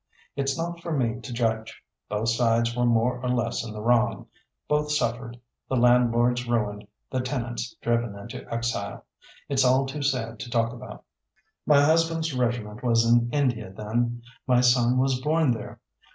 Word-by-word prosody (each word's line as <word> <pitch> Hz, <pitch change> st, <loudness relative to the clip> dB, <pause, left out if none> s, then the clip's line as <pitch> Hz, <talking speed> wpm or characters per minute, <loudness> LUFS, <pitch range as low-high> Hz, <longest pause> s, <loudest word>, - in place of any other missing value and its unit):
It's 135 Hz, -1 st, -1 dB
not 170 Hz, +1 st, -4 dB
for 170 Hz, -, -5 dB
me 120 Hz, -2 st, 0 dB
to 115 Hz, -, -8 dB
judge; 110 Hz, -2 st, -2 dB, 0.3 s
both 105 Hz, +2 st, -1 dB
sides 115 Hz, 0 st, +2 dB
were 120 Hz, 0 st, +1 dB
more 120 Hz, +2 st, +1 dB
or 125 Hz, -, -2 dB
less 120 Hz, -2 st, 0 dB
in 115 Hz, -, -7 dB
the 105 Hz, 0 st, -7 dB
wrong; 115 Hz, -3 st, +2 dB, 0.4 s
both 150 Hz, 0 st, 0 dB
suffered, 120 Hz, -4 st, -2 dB, 0.3 s
the 130 Hz, -, 0 dB
landlords 120 Hz, 0 st, +3 dB
ruined, 105 Hz, -3 st, -1 dB, 0.2 s
the 130 Hz, -, 0 dB
tenants 120 Hz, -2 st, -4 dB
driven 115 Hz, -3 st, 0 dB
into 105 Hz, +3 st, -9 dB
exile. 115 Hz, -4 st, -3 dB, 0.4 s
It's 135 Hz, -2 st, +2 dB
all 130 Hz, +1 st, +4 dB
too 140 Hz, +2 st, -5 dB
sad 120 Hz, -5 st, -1 dB
to 120 Hz, -, -6 dB
talk 115 Hz, -1 st, 0 dB
about. 125 Hz, +1 st, -10 dB, 0.6 s
"My 145 Hz, -2 st, +6 dB
husband's 165 Hz, 0 st, +2 dB
regiment 120 Hz, -3 st, -2 dB
was 115 Hz, -1 st, +3 dB
in 120 Hz, 0 st, +3 dB
India 125 Hz, -9 st, 0 dB
then; 120 Hz, +4 st, -2 dB, 0.2 s
my 125 Hz, -1 st, +4 dB
son 125 Hz, 0 st, +4 dB
was 130 Hz, 0 st, +1 dB
born 155 Hz, 0 st, +2 dB
there. 110 Hz, -3 st, -5 dB
120 Hz, 165 wpm, -26 LUFS, 115-130 Hz, 0.6 s, My